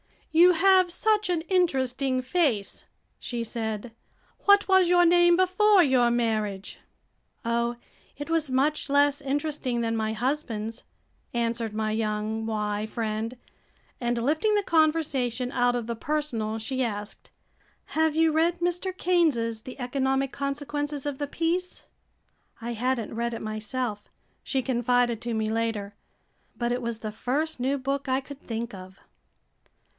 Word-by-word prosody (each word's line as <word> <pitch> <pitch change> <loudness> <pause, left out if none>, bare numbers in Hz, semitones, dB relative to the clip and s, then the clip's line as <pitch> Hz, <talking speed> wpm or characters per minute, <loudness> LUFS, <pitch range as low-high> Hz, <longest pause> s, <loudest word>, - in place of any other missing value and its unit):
"You 345 +3 +7
have 370 +1 +5
such 425 +2 +1
an 345 -3 +1
interesting 270 -7 +1
face," 255 - 0 0.3
she 240 -2 -4
said. 220 0 -4 0.5
"What 405 0 +6
was 380 -2 +5
your 350 0 +5
name 345 0 +5
before 370 +2 +4
your 255 -4 +3
marriage?" 215 -5 -1 0.7
"Oh, 235 +1 0 0.4
it 290 +3 -6
was 325 -3 +1
much 280 +3 +1
less 285 +1 +3
interesting 280 -3 -1
than 225 0 -1
my 220 0 -1
husband's," 230 -2 -3 0.5
answered 230 -2 -1
my 215 0 -1
young 215 0 -2
Y 210 -1 -2
friend, 220 +2 -3 0.6
and 240 -1 -1
lifting 310 - +1
the 410 - +2
conversation 285 -8 +1
out 245 -1 +2
of 240 -2 -2
the 235 0 -4
personal 235 -7 -2
she 260 +4 -3
asked, 210 -3 -4 0.6
"Have 315 -1 +1
you 325 0 +4
read 335 +3 +2
Mr. 355 +2 -1
Keynes' 275 -11 +1
'The 255 +2 -9
Economic 265 +1 0
Consequences 290 +1 -3
of 285 -2 -3
the 290 - -2
Peace?'" 340 +4 -2 0.7
"I 235 +1 -4
had 250 +3 0
n't 225 - -6
read 235 +1 -2
it - - -6
myself," 215 0 -4 0.3
she 265 -2 -1
confided 245 -2 +1
to 240 -1 -3
me 220 0 -1
later, 220 -3 -2 0.6
"but 240 0 -1
it 245 +1 -1
was 235 -2 -3
the 215 - -4
first 285 +8 -2
new 265 +3 0
book 275 +1 -2
I 260 +1 +1
could 280 +1 -11
think 235 -1 -5
of!" 185 0 -10
255 Hz, 145 wpm, -26 LUFS, 230-310 Hz, 0.7 s, You